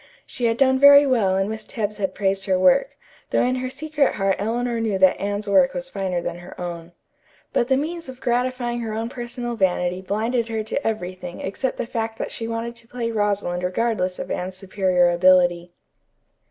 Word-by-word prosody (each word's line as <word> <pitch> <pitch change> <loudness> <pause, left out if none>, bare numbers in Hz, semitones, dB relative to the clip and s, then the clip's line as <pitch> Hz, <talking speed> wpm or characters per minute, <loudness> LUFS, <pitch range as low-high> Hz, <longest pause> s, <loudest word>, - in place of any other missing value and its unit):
She 245 - -4
had 230 0 +2
done 260 0 +3
very 285 +1 +9
well 225 -8 +2
and 195 +1 +1
Miss 220 0 -5
Tebbs 210 -2 -4
had 195 -2 -2
praised 195 -1 0
her 190 -2 +2
work, 185 - +3 0.3
though - - +2
in 255 +1 +1
her 255 0 -3
secret 295 +1 0
heart 195 -1 +1
Eleanor 235 +3 -1
knew 215 -4 0
that 190 -1 +4
Anne's 205 +1 -2
work 265 +7 +4
was 265 0 -5
finer 185 -3 -2
than 175 0 -4
her 175 - -12
own. 175 -1 -6 0.6
But 240 - +2
the 265 0 +3
means 330 +2 -4
of 255 -1 -9
gratifying 245 -1 -1
her 225 -2 -4
own 225 +1 -3
personal 240 -1 -5
vanity 180 -2 0
blinded 225 +5 -1
her 220 -1 -2
to 225 +5 -3
everything 180 -4 -4
except 250 +7 -3
the - - -2
fact 225 -1 -3
that - - -4
she 225 - -5
wanted 230 +1 -4
to 230 -1 -11
play 235 -1 -3
Rosalind 205 -4 -1
regardless 185 0 -1
of - - -6
Anne's 185 +1 -4
superior 185 -2 +2
ability. 175 -1 +3
220 Hz, 195 wpm, -22 LUFS, 185-245 Hz, 0.6 s, very